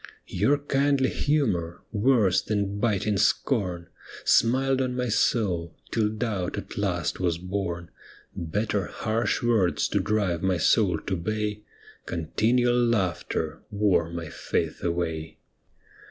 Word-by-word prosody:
Your 145 +2 +2
kindly 140 -1 +1
humour, 100 - 0
worse 105 -4 +3
than 100 -1 -2
biting 105 -2 +1
scorn, 95 -4 +1 0.4
Smiled 130 +3 +3
on 125 -1 -1
my 125 -1 -1
soul, 90 -7 +1 0.2
till 110 -2 +1
doubt 105 -4 -2
at - - -6
last - - -1
was 85 -3 0
born 90 -2 -4 0.4
Better 100 +3 -1
harsh 115 +2 -1
words 110 -7 +2
to - - +1
drive 100 -6 0
mj' 95 -3 +1
soul 95 -5 +3
to 95 - -2
bay 105 +3 -2 0.5
Continual 120 +9 +1
laughter 95 -8 -1
wore 100 -6 +2
my 85 -2 -6 0.2
laith - - 0
away. 80 -2 -2
105 Hz, 120 wpm, -26 LUFS, 85-115 Hz, 0.5 s, worse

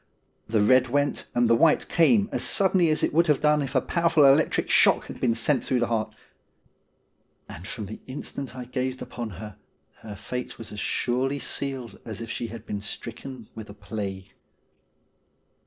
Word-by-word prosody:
The 110 -2 +2
red 130 +3 +5
went 145 +3 0
and 120 0 +3
the 115 - +5
white 155 +6 +3
came 200 +5 +4
as - - -1
suddenly 190 -4 +3
as 155 - +1
it - - +1
would 170 +2 +4
have 150 -3 +3
done 150 0 +3
if 135 0 -4
a 130 - +4
powerful 165 -2 +3
electric 140 +3 +4
shock - - +4
had - - -9
been 115 -2 +2
sent 125 +3 +1
through 125 - 0
the 120 - +2
heart; 110 -1 -2 1.3
and 90 +5 -9
from 110 -1 -5
the 110 +3 -8
instant 135 -1 -6
I 125 -1 -6
gazed 130 +1 -3
upon 120 -2 -6
her 105 0 -9 0.4
her 105 -2 -9
fate 125 +5 -6
was 115 - -9
as 105 - -6
surely 130 +6 0
sealed 135 -6 -3
as 110 -3 -6
if 115 -1 -6
she 120 - -3
had 115 0 -9
been 100 -1 -4
stricken 115 +3 -7
with 110 -1 -9
a 100 - -10
plague. 100 -2 -6
125 Hz, 185 wpm, -26 LUFS, 110-140 Hz, 1.3 s, red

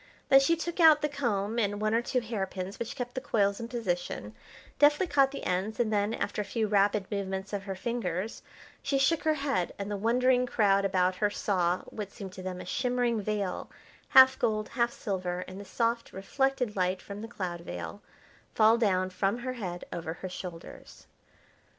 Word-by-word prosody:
Then 270 - +8
she 275 +5 +3
took 340 +2 -5
out 315 -3 +7
the - - +3
comb 235 -6 -1
and 205 -2 0
one 215 +1 0
or 230 - +3
two 250 +1 -1
hairpins 195 -4 -4
which 235 - -4
kept 245 -1 -5
the 260 - -3
coils 200 -7 +1
in 230 - -5
position, 175 - -3 0.5
deftly 295 +5 +5
caught 275 -5 +3
the 275 - -7
ends, 190 +4 -1
and 225 -2 +1
then, 205 +2 +1
after 205 - -2
a - - -2
few 220 +2 -1
rapid 205 -1 +2
movements 195 0 -3
of 200 -1 -3
her 195 -1 -4
fingers, 210 -2 -3 0.4
she 275 0 0
shook 280 +4 +3
her 310 -1 +3
head, 275 - -1
and 200 +1 -4
the 205 - -1
wondering 250 +4 +2
crowd 200 -4 +3
about 185 -1 +1
her 210 +1 +2
saw, 185 -3 0
what 205 -2 -7
seemed 195 -4 -8
to 185 - -8
them 185 -1 -5
a - - -7
shimmering 245 -3 0
veil, 205 -2 -2 0.4
half 260 0 +7
gold, 215 -1 0
half 235 -1 +1
silver, 180 -5 -3
in 185 +1 -8
the 200 - -8
soft 230 +2 -1
reflected 250 +4 -1
light 185 0 0
from 200 +2 -8
the 225 - -6
cloud 180 -6 -5
veil, 85 - -7 0.5
fall 225 +1 +5
down 185 -4 +1
from 195 +4 0
her 255 +1 -4
head 185 -8 -5
over 165 -2 -4
her 185 +3 -7
shoulders. 180 -2 -9
210 Hz, 195 wpm, -29 LUFS, 190-245 Hz, 0.5 s, Then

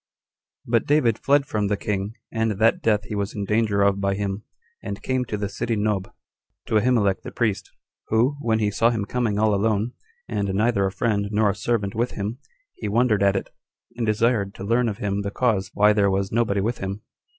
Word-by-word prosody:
1. - - -10
But 115 -2 +2
David 130 -7 +3
fled 140 0 +3
from 105 -5 -1
the 105 0 0
king, 100 +1 -3 0.2
and 110 -1 0
that 110 +3 +2
death 105 -2 +2
he 105 - -7
was 100 -1 -2
in 100 -1 -3
danger 105 -1 +2
of 100 0 +2
by 100 0 +1
him, 100 0 -3 0.4
and - - -6
came 130 -1 0
to 105 - -3
the 100 0 -2
city 110 +3 -2
Nob, 105 -2 -1 0.5
to 110 - +2
Ahimelech 105 -5 +2
the - - -8
priest, 110 -6 -1 0.4
who, 120 +6 +2
when 110 -3 +1
he 105 -2 +1
saw 115 +3 +3
him 110 -4 -1
coming 115 -3 -1
all 110 0 +3
alone, 105 +2 +1 0.4
and 100 -1 -1
neither 105 -2 +2
a - - -3
friend 100 0 0
nor 105 -1 +2
a - - -6
servant 105 -3 -1
with 120 +3 -1
him, 105 +5 -4 0.3
he - - -6
wondered 110 -1 +2
at 100 0 +3
it, 95 - -3 0.4
and 120 -2 -2
desired 110 -2 +1
to - - -8
learn 115 +3 +2
of 100 - -5
him 100 -3 -2
the 100 - -3
cause 105 -3 0
why 105 +1 +5
there 100 -2 +3
was 95 0 -1
nobody 105 -3 +1
with 115 +4 -2
him. 95 +2 -5
105 Hz, 215 wpm, -23 LUFS, 100-115 Hz, 0.5 s, why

